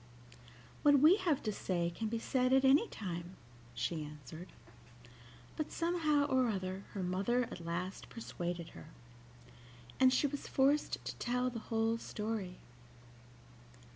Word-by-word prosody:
"What 290 Hz, -1 st, +6 dB
we 315 Hz, +8 st, +7 dB
have 340 Hz, -8 st, 0 dB
to 215 Hz, -, 0 dB
say 175 Hz, -4 st, -1 dB
can 220 Hz, -, -2 dB
be 230 Hz, +2 st, -1 dB
said 255 Hz, +2 st, +1 dB
at 265 Hz, 0 st, +5 dB
any 285 Hz, +12 st, +5 dB
time," 175 Hz, -2 st, -6 dB, 0.4 s
she 140 Hz, +7 st, -2 dB
answered. 150 Hz, +3 st, -9 dB, 1.1 s
But 310 Hz, -, -3 dB
somehow 325 Hz, -4 st, +2 dB
or 260 Hz, -3 st, +2 dB
other 190 Hz, -2 st, -3 dB
her 195 Hz, -, -3 dB
mother 195 Hz, +8 st, +1 dB
at 180 Hz, -7 st, -7 dB
last 175 Hz, +3 st, -4 dB
persuaded 175 Hz, -6 st, -5 dB
her, -, -, -12 dB, 1.1 s
and 260 Hz, -1 st, +6 dB
she 255 Hz, -, +3 dB
was 285 Hz, 0 st, -3 dB
forced 280 Hz, +3 st, +2 dB
to -, -, -4 dB
tell 250 Hz, +1 st, 0 dB
the 235 Hz, -, -5 dB
whole 225 Hz, 0 st, +1 dB
story. 210 Hz, -5 st, -4 dB
225 Hz, 140 wpm, -34 LUFS, 180-265 Hz, 1.1 s, we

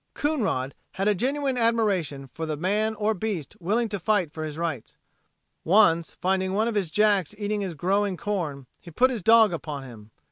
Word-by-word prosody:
Coonrod 205 Hz, -, -1 dB, 0.2 s
had 195 Hz, +2 st, -1 dB
a 210 Hz, -, +5 dB
genuine 265 Hz, +5 st, -1 dB
admiration 195 Hz, -, +1 dB
for 160 Hz, 0 st, -4 dB
the 155 Hz, -1 st, -3 dB
man 210 Hz, +6 st, 0 dB
or 215 Hz, +1 st, +1 dB
beast 190 Hz, -7 st, -4 dB
willing 215 Hz, +7 st, 0 dB
to 205 Hz, -1 st, -3 dB
fight 185 Hz, -4 st, +1 dB
for 155 Hz, -, -5 dB
his 155 Hz, -1 st, -5 dB
rights. 160 Hz, -8 st, -4 dB, 0.7 s
Once 170 Hz, -3 st, +3 dB
finding 190 Hz, 0 st, 0 dB
one 215 Hz, +3 st, +1 dB
of 235 Hz, -, -1 dB
his 200 Hz, -5 st, -1 dB
jacks 205 Hz, 0 st, +2 dB
eating 210 Hz, 0 st, -2 dB
his 185 Hz, -4 st, -4 dB
growing 195 Hz, +4 st, 0 dB
corn, 160 Hz, -11 st, -3 dB
he 175 Hz, -, -13 dB
put 255 Hz, +11 st, +3 dB
his 235 Hz, -5 st, -3 dB
dog 225 Hz, 0 st, +6 dB
upon 150 Hz, -4 st, -5 dB
him. 110 Hz, -5 st, -12 dB
195 Hz, 185 wpm, -25 LUFS, 160-215 Hz, 0.7 s, dog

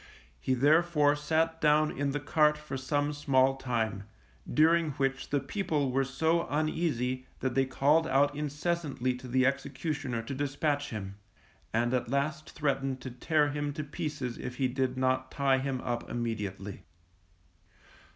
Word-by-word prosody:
He 130 Hz, -, 0 dB
therefore 150 Hz, +2 st, +4 dB
sat 160 Hz, +2 st, 0 dB
down 150 Hz, 0 st, +3 dB
in 140 Hz, 0 st, 0 dB
the 145 Hz, +1 st, -1 dB
cart 150 Hz, +1 st, +3 dB
for 150 Hz, -2 st, -7 dB
some 145 Hz, +3 st, 0 dB
small 135 Hz, -2 st, +3 dB
time, 110 Hz, -6 st, -2 dB, 0.5 s
during 160 Hz, 0 st, +4 dB
which 135 Hz, 0 st, -1 dB
the 145 Hz, -, +2 dB
people 145 Hz, -2 st, -1 dB
were 135 Hz, +1 st, +2 dB
so 160 Hz, +5 st, +1 dB
uneasy 140 Hz, -4 st, -1 dB
that 130 Hz, -2 st, 0 dB
they 135 Hz, +1 st, +3 dB
called 150 Hz, +5 st, +3 dB
out 145 Hz, 0 st, +3 dB
incessantly 150 Hz, -3 st, -1 dB
to 125 Hz, +1 st, -9 dB
the 130 Hz, +1 st, +2 dB
executioner 140 Hz, -2 st, -2 dB
to 125 Hz, -, -5 dB
dispatch 145 Hz, +1 st, -1 dB
him, 100 Hz, -3 st, -6 dB, 0.5 s
and 120 Hz, +2 st, +1 dB
at 125 Hz, -2 st, 0 dB
last 150 Hz, +4 st, -1 dB
threatened 135 Hz, -3 st, -1 dB
to 130 Hz, -, -6 dB
tear 150 Hz, +4 st, +1 dB
him 145 Hz, 0 st, -2 dB
to 155 Hz, +1 st, -4 dB
pieces 145 Hz, -5 st, -4 dB
if 125 Hz, -1 st, -5 dB
he 130 Hz, 0 st, +1 dB
did 130 Hz, 0 st, -1 dB
not 130 Hz, 0 st, +1 dB
tie 135 Hz, -2 st, +2 dB
him 135 Hz, -1 st, -2 dB
up 120 Hz, -1 st, -3 dB
immediately. 105 Hz, -4 st, -4 dB
140 Hz, 150 wpm, -30 LUFS, 130-150 Hz, 0.5 s, therefore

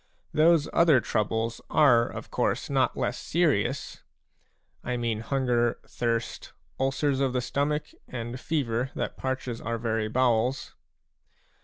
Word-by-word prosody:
Those 155 Hz, 0 st, +4 dB
other 160 Hz, -6 st, +5 dB
troubles 110 Hz, +1 st, -1 dB
are 120 Hz, -6 st, +5 dB
of -, -, -8 dB
course -, -, -1 dB
not -, -, +1 dB
less -, -, -1 dB
serious; -, -, 0 dB, 0.8 s
I 125 Hz, 0 st, -2 dB
mean 115 Hz, -2 st, -1 dB
hunger, 120 Hz, -1 st, +1 dB
thirst, 115 Hz, -1 st, -3 dB, 0.3 s
ulcers 135 Hz, +1 st, +1 dB
of 135 Hz, -2 st, +1 dB
the 125 Hz, -, +1 dB
stomach, 150 Hz, +4 st, -1 dB, 0.2 s
and 120 Hz, 0 st, -5 dB
fever 130 Hz, -5 st, -1 dB
that -, -, -3 dB
parches 130 Hz, -3 st, -3 dB
our 115 Hz, +1 st, -2 dB
very 110 Hz, -1 st, -1 dB
bowels. 125 Hz, +1 st, +1 dB
125 Hz, 125 wpm, -27 LUFS, 115-140 Hz, 0.8 s, other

